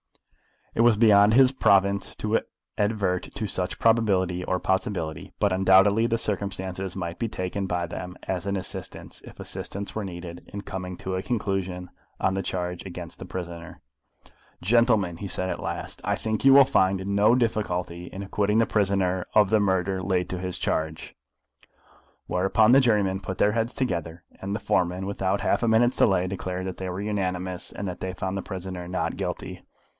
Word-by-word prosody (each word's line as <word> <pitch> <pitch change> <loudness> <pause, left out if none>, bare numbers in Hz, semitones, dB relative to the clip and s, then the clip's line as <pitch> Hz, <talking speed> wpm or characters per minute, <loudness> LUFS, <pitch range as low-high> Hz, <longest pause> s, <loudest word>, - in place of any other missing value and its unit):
It - - +1
was 120 -2 +6
beyond 105 -1 +6
his 130 +1 +6
province 100 -6 +2
to 110 +1 +1 0.4
advert 100 -4 0
to 110 - -2
such 90 -2 -2
probability 95 -6 +2
or 90 - 0
possibility; 90 -5 -2
but 100 - +2
undoubtedly 95 +4 +5
the 115 - +1
circumstances 95 -3 -3
might 85 -2 -5
be 115 - 0
taken 95 -1 -3
by 90 -1 -1
them 90 +2 -7
as 95 0 -3
an 100 - 0
assistance, 95 - -6
if - - -13
assistance 100 +1 -6
were 110 -2 -3
needed, 85 -1 -8
in 100 - -5
coming 90 -2 -6
to 95 0 -3
a 95 - -1
conclusion 95 -5 -2 0.3
on 95 - +1
the 95 - -1
charge 90 -1 -3
against 90 -3 -8
the - - -7
prisoner. 85 -2 -7 0.8
"Gentlemen," 110 -4 +3
he 100 - -5
said 95 0 -1
at - - -3
last, - - -5
"I - - +1
think 110 +2 -2
you 135 - +8
will 140 0 +9
find 95 -7 +2
no 100 +4 +4
difficulty 90 -7 -1
in 95 +2 -7
acquitting 105 +2 0
the 115 - +4
prisoner 95 -4 +1
of 105 -2 +6
the 110 - +4
murder 95 -1 +1
laid 90 -1 0
to 90 - -3
his 90 -1 -4
charge," 80 0 -2 1.1
whereupon 95 +5 +3
the 135 - +8
jurymen 105 -6 +2
put 95 -1 -5
their 105 - +3
heads 115 +2 -1
together; 85 - -3 0.2
and 100 +1 -3
the - - -2
foreman, 90 -1 0
without 95 0 -1
half - - +1
a 120 - +1
minute's 120 +3 +3
delay, 95 -3 +3
declared 95 -1 -4
that 95 -1 -5
they 95 -1 -4
were 90 +2 -4
unanimous, 95 -3 -3
and 100 - -4
that 90 - -7
they 95 0 -4
found 95 +1 -3
the - - -2
prisoner 95 -2 -6
Not 90 -2 -2
Guilty. - - -5
95 Hz, 180 wpm, -26 LUFS, 90-105 Hz, 1.1 s, will